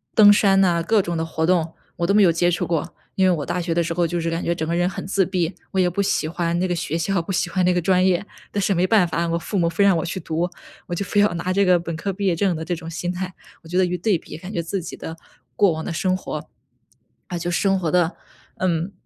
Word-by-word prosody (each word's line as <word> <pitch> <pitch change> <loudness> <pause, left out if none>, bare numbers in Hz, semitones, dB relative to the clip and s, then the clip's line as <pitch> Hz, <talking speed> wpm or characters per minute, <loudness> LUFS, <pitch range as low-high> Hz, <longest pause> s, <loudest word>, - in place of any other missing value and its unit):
登 205 -2 +8
山 195 -2 +4
呐， 170 -3 +2
各 215 +4 +3
种 175 -2 -3
的 160 - -1
活 160 0 -1
动， 165 -2 +1 0.2
我 170 - 0
都 200 - +2
没 210 - +5
有 175 - +6
接 175 +1 +2
触 175 - -1
过。 165 -3 -2 0.2
因 190 -1 +3
为 - - +4
我 145 - -4
大 180 - -2
学 170 -1 -2
的 170 - +2
时 165 0 -2
候 175 0 +1
就 175 +1 -2
是 165 0 -1
感 165 - -2
觉 170 - 0
整 160 -2 -3
个 170 - 0
人 175 +1 +2
很 185 - -6
自 195 +1 +2
闭， 180 -2 -1 0.2
我 190 - 0
也 180 - +4
不 180 +3 -1
喜 195 -5 0
欢 170 +1 -1
那 185 +2 0
个 175 - -1
学 165 -1 -2
校、 180 +2 0
不 180 +4 -6
喜 180 - 0
欢 185 +2 0
那 180 - +4
个 180 - +1
专 185 +1 +2
业， 185 +1 +2 0.3
但 205 - -2
是 195 +1 +2
没 185 +1 +2
办 210 -6 +4
法， 170 +1 -1
我 170 0 0
父 195 +3 -2
母 170 - +2
非 200 - +1
让 195 -2 +5
我 160 - -1
去 175 +2 -4
读， 165 +1 -2 0.4
我 175 - -3
就 200 - -3
非 205 - +2
要 205 - +3
拿 180 +2 -2
这 200 - +3
个 180 -2 +5
本 170 -1 -5
科 195 +5 -3
毕 200 +1 -4
业 180 -3 +2
证 185 +1 +1
的 160 0 -5
这 175 - -1
种 165 0 -8
心 175 +2 -3
态。 185 +1 -4 0.3
我 - - -15
觉 175 +2 -2
得 185 - +4
一 180 0 -2
对 200 0 +2
比， 155 - -11
感 180 +3 -9
觉 170 -5 -2
自 185 +3 -3
己 - - -8
的 160 - -7 0.4
过 200 +4 +4
往 160 0 -5
的 170 - -3
生 185 +3 0
活， - - -6 0.8
啊， 175 - -4
就 175 +1 -3
生 195 +2 +2
活 165 -4 -1
得， 175 -1 +1 0.4
嗯， 175 0 0
175 Hz, 320 characters per minute, -22 LUFS, 165-190 Hz, 0.8 s, 登